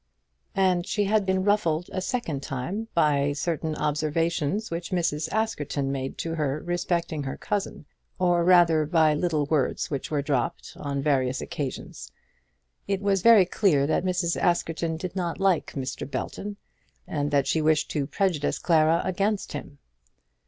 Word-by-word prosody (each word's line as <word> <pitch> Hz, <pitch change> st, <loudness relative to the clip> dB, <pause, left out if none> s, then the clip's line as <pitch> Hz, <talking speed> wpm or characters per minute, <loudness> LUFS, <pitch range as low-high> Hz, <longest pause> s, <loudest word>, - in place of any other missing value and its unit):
And 185 Hz, -2 st, +2 dB
she 210 Hz, -, 0 dB
had 205 Hz, 0 st, +1 dB
been 190 Hz, 0 st, +1 dB
ruffled 180 Hz, -5 st, +1 dB
a 185 Hz, -, -2 dB
second 185 Hz, -, -2 dB
time 140 Hz, -, -4 dB
by 145 Hz, -3 st, +3 dB
certain 155 Hz, +1 st, -2 dB
observations 160 Hz, +6 st, -1 dB
which 170 Hz, +1 st, -4 dB
Mrs. 160 Hz, -3 st, -1 dB
Askerton 150 Hz, -10 st, -1 dB
made 135 Hz, -1 st, -4 dB
to 165 Hz, -, -3 dB
her 150 Hz, -3 st, -1 dB
respecting 175 Hz, -2 st, -1 dB
her 135 Hz, -1 st, -4 dB
cousin 205 Hz, -6 st, -3 dB, 0.3 s
or 175 Hz, -2 st, +2 dB
rather 170 Hz, -4 st, +5 dB
by 160 Hz, -2 st, +4 dB
little 155 Hz, -1 st, 0 dB
words 145 Hz, -1 st, 0 dB
which 140 Hz, -, -3 dB
were 145 Hz, -2 st, -1 dB
dropped 135 Hz, -4 st, -2 dB
on 140 Hz, -1 st, -3 dB
various 130 Hz, -3 st, +1 dB
occasions. 145 Hz, -6 st, -6 dB, 0.8 s
It 195 Hz, 0 st, -1 dB
was 195 Hz, -2 st, +2 dB
very 225 Hz, -3 st, +7 dB
clear 175 Hz, -6 st, +2 dB
that 150 Hz, -, +1 dB
Mrs. 180 Hz, -2 st, 0 dB
Askerton 165 Hz, -1 st, 0 dB
did 180 Hz, +2 st, -6 dB
not 175 Hz, -3 st, -2 dB
like 190 Hz, -4 st, +1 dB
Mr. 135 Hz, 0 st, -4 dB
Belton, 205 Hz, +7 st, -5 dB, 0.5 s
and 145 Hz, -1 st, -2 dB
that 140 Hz, -2 st, +2 dB
she 155 Hz, +4 st, +1 dB
wished 155 Hz, 0 st, +2 dB
to 145 Hz, -3 st, -1 dB
prejudice 175 Hz, -7 st, 0 dB
Clara 165 Hz, 0 st, +3 dB
against 200 Hz, +3 st, -1 dB
him. 145 Hz, -1 st, -7 dB
165 Hz, 150 wpm, -26 LUFS, 145-185 Hz, 0.8 s, very